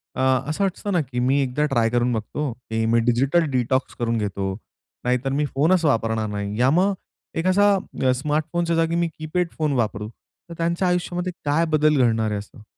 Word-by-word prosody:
अ, - - -2 0.3
असं 155 +6 -1
वाटतं 195 +1 -2
ना, 175 - +3
की 125 -3 -4
मी 130 +3 +2
एकदा 135 +3 0
ट्राय 120 -6 +1
करून 120 +1 +1
बघतो, 125 +6 -3
की 110 -1 -3
मी 115 +1 +3
डिजिटल 135 +8 +3
डिटॉक्स 130 +1 0
करून 115 -1 0
घेतो. 100 -2 -2 0.5
नाहीतर 125 +2 0
मी 150 +2 +1
फोनच 165 +5 +3
वापरणार 115 -5 +1
नाही 105 +1 -4
याम 135 +7 +4 0.6
एक 165 +3 -1
असा 200 +2 +4 0.4
स्मार्टफोनच्या 155 +4 -1
जागी 165 0 +1
मी 170 0 +1
कीपॅड 160 +3 -1
फोन 155 -2 0
वापरू, 110 -4 -1
तर 170 +8 -17
त्यांच्या 170 +2 0
आयुष्यामध्ये 180 0 -1
काय 150 +3 +2
बदल 155 -1 +3
घडणार 110 -2 +2
आहे 105 - -1
असं? 105 +1 -13
135 Hz, 180 wpm, -23 LUFS, 115-165 Hz, 0.6 s, याम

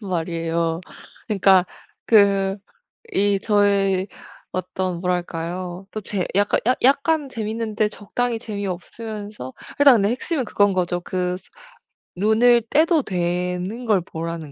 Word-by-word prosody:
말이에요. 165 -3 -2 0.5
그러니까 190 -3 +4 0.4
그 200 -2 +4 0.6
이 200 - +2
저의 200 -2 +2 0.4
어떤 185 -1 -3
뭐랄까요. 180 +1 -3
또 215 - -4
제 195 -2 -2
약간 205 0 +3
약 255 - +3
약간 280 +2 +3
재미있는데 220 -2 -2
적당히 230 +3 -3
재미없으면서 205 - -6 0.3
일단 280 -3 +8
근데 205 -2 +2
핵심은 255 +3 -1
그건 205 -2 +2
거죠. 175 -1 0
그 180 0 -2
스 190 - -16 0.7
눈을 230 +4 +4
떼도 315 0 +3
되는 180 +5 -2
걸 210 -4 +3
보라는 165 -3 -6
200 Hz, 255 characters per minute, -22 LUFS, 180-220 Hz, 0.7 s, 일단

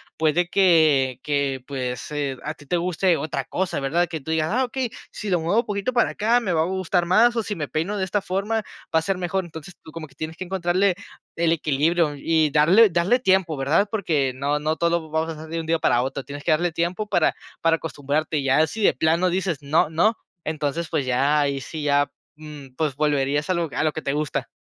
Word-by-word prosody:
puede 160 +3 +1
que 155 -9 +3
que 140 -3 -1
pues, 125 -1 -4
eh, 140 -3 -2
a 150 - -3
ti 145 - -17
te 175 +6 0
guste 175 0 +1
otra 140 -2 -3
cosa, 185 -4 -2
¿verdad?, 170 +6 +1
que 160 -3 -5
tú 160 - -5
digas: 160 -1 +1
"Ah, 255 +2 +2
okey, 255 0 -2 0.2
si 210 - -6
lo 180 -2 +2
muevo 175 +8 +2
un - - -19
poquito 205 +3 -2
para 240 -1 +2
acá, 230 +3 +2
me 200 -7 -2
va 160 - +2
a - - +2
gustar 185 -1 0
más, 230 +7 +4
o 230 - 0
si 205 - -4
me 155 -5 -4
peino 170 +9 -2
de 190 - 0
esta 200 +2 -1
forma, 200 +4 -1 0.4
va 160 - +5
a - - -3
ser 190 +3 -1
mejor". 185 +1 -1
Entonces 165 +1 -10
tú 160 - -12
como 160 -1 -7
que 135 - -24
tienes 160 +3 -6
que 185 - -5
encontrar 175 -1 -1
el 185 -3 -1
equilibrio 155 +1 +1
y 155 +1 +1
darle 175 +10 +6
darle 185 +9 +2
tiempo, 190 - +2
¿verdad?, 160 +10 +2
porque 155 -11 0
no 140 +3 -1
no 155 +1 -1
todo 170 -2 0
vamos 160 +1 -1
a 155 - -10
hacer 160 - -10
de 165 0 -3
un 160 - -5
día 165 0 +1
para 120 -4 +2
otro. 135 +1 -4
Tienes 145 +1 -8
que 170 - +1
darle 170 +2 +2
tiempo 175 +6 -2
para 170 -3 +2 0.3
para 165 0 +3
acostumbrarte, 155 0 -2
y 140 - -1
ya 135 +4 +4
si 215 +7 -4
de - - +5
plano 165 +3 +2
dices: 180 -4 -1
"No, 150 +2 +2
no", 175 +8 +2 0.3
entonces 155 +1 -2
pues 140 - -1
ya 140 +4 +2
ahí 140 -1 0
sí 150 +3 -6
ya, 145 -1 +2 0.2
mm, 150 -4 -11
pues 150 -4 -1
volverías 145 +1 0
a 185 - +2
lo 170 -1 0
a - - 0
lo 155 - +2
que 160 - -6
te 140 - -1
gusta. 150 0 -2
160 Hz, 235 wpm, -23 LUFS, 145-185 Hz, 0.4 s, darle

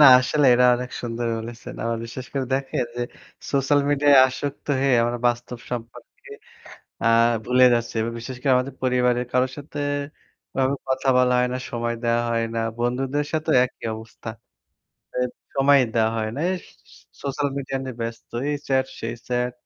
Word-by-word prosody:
না 150 - +9 0.2
আসলেই 135 +1 +3
এটা 125 +1 +4
অনেক 125 0 -5
সুন্দর 120 0 -3
বলেছেন। 115 -1 -8
আবার 115 0 -1
বিশেষ 125 +2 -7
করে 135 -2 -1
দেখেন 135 -2 -1
যে 120 - -1 0.5
সোশ্যাল 140 +1 +3
মিডিয়ায় 145 -1 +5
আসক্ত 140 +2 -5
হয়ে 135 -2 +3
আমরা 120 +1 -1
বাস্তব 120 0 -1
সম্পর্কে 120 -1 -8 0.7
আ - - +2 0.4
ভুলে 125 +1 +5
যাচ্ছি। 115 0 -2 0.2
বিশেষ 125 +3 -7
করে 135 0 +2
আমাদের 130 +1 -1
পরিবারের 125 -1 +2
কারোর 130 0 +2
সাথে 145 0 -8 0.8
এভাবে 135 +1 +2
কথা 130 +1 0
বলা 125 0 +4
হয় 125 0 +2
না, 125 - -1
সময় 120 0 -2
দেওয়া 120 0 +2
হয় 115 0 +1
না। 115 - 0 0.2
বন্ধুদের 130 +4 0
সাথেও 155 -1 +1
একই - - -16
অবস্থা। 110 0 -10 1.3
সময় 140 +1 +5 0.2
দেওয়া 110 -1 +3
হয় 110 -1 -1
না। - - -4
এই - - 0 0.7
সোশ্যাল 140 +1 -1
মিডিয়া 135 -1 -3
নিয়ে 130 -3 -6
ব্যস্ত। 115 0 -5 0.2
এই 150 - 0
চ্যাট, 130 -1 +2
সেই 115 +1 -4
চ্যাট 125 0 0
125 Hz, 160 wpm, -23 LUFS, 120-135 Hz, 1.3 s, না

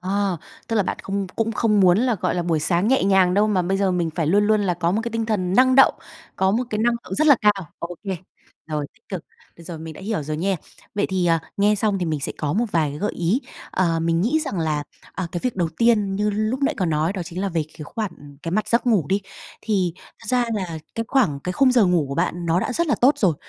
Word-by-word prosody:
À, 195 0 0 0.3
tức 225 - 0
là 210 - +4
bạn - - -3
không 195 0 -2
cũng 225 0 0
không 210 -2 +2
muốn 180 +1 +5
là, 245 -1 +2
gọi 180 - -1
là, 175 - 0
buổi 165 -3 0
sáng 175 +6 +1
nhẹ 265 -5 +3
nhàng 190 -2 +4
đâu 210 +1 +4
mà 190 -4 +2
bây 190 +2 0
giờ 195 -2 +2
mình 175 -3 0
phải 165 -3 -1
luôn 205 +6 +3
luôn 215 -1 +3
là 180 -3 +1
có 170 0 0
một 210 - +1
cái 235 - -3
tinh 225 0 -2
thần 190 -4 0
năng 255 +2 +5
động, 270 - +6 0.4
có 190 0 +2
một 235 +5 +1
cái 215 - -1
năng 235 +2 +2
lượng - - -5
rất 310 - +2
là 285 -4 +7
cao. 200 -6 +2
Ô 170 +1 -5
kê, 190 -2 -2 0.5
rồi 150 -2 -3
tích 225 - -30
cực, 185 -5 -5 0.3
bây 170 - -14
giờ 165 -2 -7
mình 160 0 -8
đã - - -11
hiểu 200 -5 -2
rồi 150 +1 -4
nha. 190 +3 0 0.4
Vậy 205 - +1
thì, 185 -2 0
à, 165 -1 +3 0.2
nghe 205 +1 +3
xong 205 -1 0
thì 180 - -1
mình 155 -3 -1
sẽ - - -3
có 145 -2 -1
một 230 +6 +1
vài 155 -4 +2
cái 145 - -7
gợi 205 - -1
ý. 180 +10 0 0.3
Ờ, 170 -3 +1
mình 165 0 +1
nghĩ 280 - +2
rằng 200 - -3
là, 155 -2 0 0.3
à, 185 - -3
cái 175 - -2
việc 250 -5 -1
đầu 170 -3 +1
tiên 210 -5 +3
như 210 +1 +1
lúc 215 +6 -1
nãy 295 +2 +2
có 185 -4 0
nói 160 +3 +1
đó 190 -3 -4
chính 175 +2 -6
là 200 - 0
về 165 -3 -1
cái 150 - -6
khoản, 215 +3 -4
ừm, 145 -1 -14
cái 165 - -4
mặt 215 +2 0
giấc 235 +2 +2
ngủ 200 -11 +3
đi, 195 +2 +1 0.4
thì 190 -6 0 0.3
thực - - -11
ra 250 -1 +2
là 175 -6 -3 0.2
cái 230 - -2
khoảng, 200 - +2
cái 180 - -3
khung 260 +2 +4
giờ 235 -5 +5
ngủ 170 -5 +2
của 140 - -4
bạn 175 0 -1
nó 170 +3 +2
đã 225 - -2
rất 340 +6 0
là 285 - +2
tốt 280 +4 +4
rồi, 180 -7 +3
190 Hz, 280 wpm, -22 LUFS, 170-220 Hz, 0.5 s, là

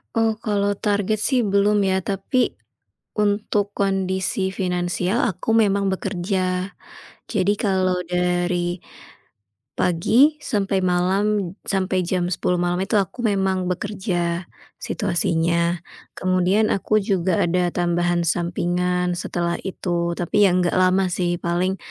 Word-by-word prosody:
Oh, 225 -1 +3
kalau 205 -3 0
target 205 0 0
sih 250 +2 +1
belum 205 +1 +2
ya, 190 -1 +2
tapi 200 +7 -1 0.6
untuk 205 0 0
kondisi 190 -1 0
finansial, 180 +2 -1
aku 185 +3 -4
memang 200 -2 +2
bekerja. 185 0 -2 0.6
Jadi 205 -1 +1
kalau 185 -3 +1
dari 175 0 0 1.0
pagi 230 - +3
sampai 200 -4 0
malam, 185 +1 +1
sampai 185 -2 0
jam 175 0 -1
10:00 180 0 0
malam 175 0 0
itu 215 - 0
aku 195 +6 -4
memang 190 -3 +1
bekerja, 180 -3 -2 0.3
situasinya. 170 0 0 0.3
Kemudian 185 +3 +2
aku 215 +2 +1
juga 185 -3 +1
ada 175 0 +1
tambahan 175 0 +1
sampingan 175 +1 0
setelah 170 0 -2
itu 175 -2 -2
tapi 175 +4 +2
ya 185 - +3
nggak 180 0 +1
lama 185 +1 +3
sih 175 -1 -1
paling, 180 +2 0
185 Hz, 115 wpm, -22 LUFS, 175-200 Hz, 1.0 s, Oh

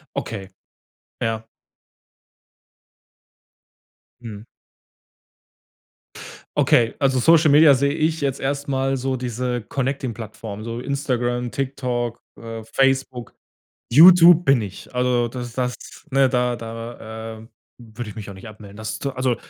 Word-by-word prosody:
Okay. 100 -4 -5 0.7
Ja. 115 0 -2 2.8
Mhm. 110 -2 -9 2.1
Okay, 115 -1 +3
also, 135 -2 +2
Social 160 +4 +5
Media 150 0 +7
sehe 140 +2 +1
ich 160 0 0
jetzt 135 -1 -1
erst 140 +1 -3
mal 135 0 0
so 130 0 -2
diese 125 0 -3
connecting 135 0 -3
Plattform, 110 -2 -8
so 115 +1 -5
Instagram, 125 -3 -2
TikTok, 125 -3 -3 0.2
äh, 115 -1 -7
Facebook, 135 -3 0 0.6
YouTube 175 +3 +8
bin 135 -5 +4
ich. 100 -2 -9
Also, 125 -1 +1
das 120 -1 -7
das, 125 0 -2 0.4
ne, 135 0 +4
da 125 -1 0
da, 115 -1 -8
ähm, 115 +2 -15 0.3
würde 115 -1 -8
ich 105 - -13
mich 105 -2 -7
auch - - -9
nicht 95 +4 -11
abmelden. 105 -2 -13
Das 110 0 -5
ist - - -9
so, 140 - -2
also 130 -2 0
125 Hz, 125 wpm, -22 LUFS, 115-135 Hz, 2.8 s, YouTube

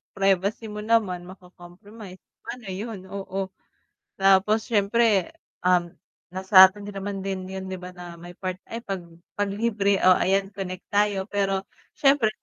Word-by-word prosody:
privacy 195 +3 +1
mo 210 - -6
naman 210 -5 0
mako-compromise, 185 +2 -13 0.3
paano 245 -4 -8
yun? 210 +2 -5
Oo, 195 -1 -4 0.7
tapos 195 +3 +4
siyempre, 210 -2 +2 0.3
um, 180 -1 +3 0.4
na 185 - -5
sa'tin 190 +1 +7
naman 195 0 -5
din 190 -1 -4
yun 190 0 -6
'di 185 -1 -6
ba 180 - -7
na 175 -1 -8
may 175 +1 -12
part 185 0 -4
ay 230 - -4
‘pag 195 -2 -3 0.3
‘pag 205 0 0
libre, 200 -1 +1
o 185 - +8
ayan 195 +2 +1
connect 185 -2 -6
tayo 205 -2 +2
pero 195 -1 -1 0.3
syempre 275 -5 +4
195 Hz, 145 wpm, -25 LUFS, 185-205 Hz, 0.7 s, o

